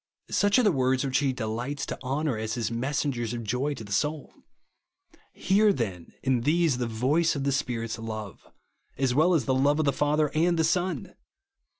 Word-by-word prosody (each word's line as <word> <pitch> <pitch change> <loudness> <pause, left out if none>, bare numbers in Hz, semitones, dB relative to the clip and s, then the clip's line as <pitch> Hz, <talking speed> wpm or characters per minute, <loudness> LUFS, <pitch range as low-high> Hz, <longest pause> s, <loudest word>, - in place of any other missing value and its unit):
Such 205 +2 +3
are 250 - +4
the 210 - +4
words 130 -2 +1
which 135 0 +1
he 140 -2 +1
delights 125 +4 -3
to - - -6
honour 135 +1 -1
as 110 +1 -3
his 115 -2 -2
messengers 125 -1 -2
of 115 - -5
joy 125 +7 -1
to 115 - -8
the 100 - -11
souL 150 +8 -1 1.0
Hear 205 +3 +3
then, 95 - -4
in 130 -3 +1
these, 155 -1 +2
the 120 - -1
voice 140 +9 +1
of 140 - -2
the 140 - +1
Spirit's 115 -4 -2
love, 110 -4 -7 0.5
as 130 -2 +1
well 165 +6 +4
as 140 -7 +1
the 130 - +1
love 140 +3 +3
of 155 - +1
the 140 - +2
Father 150 0 +1
and 170 +2 +2
the 160 - +2
Son 175 -2 -1
135 Hz, 195 wpm, -27 LUFS, 120-155 Hz, 1.0 s, are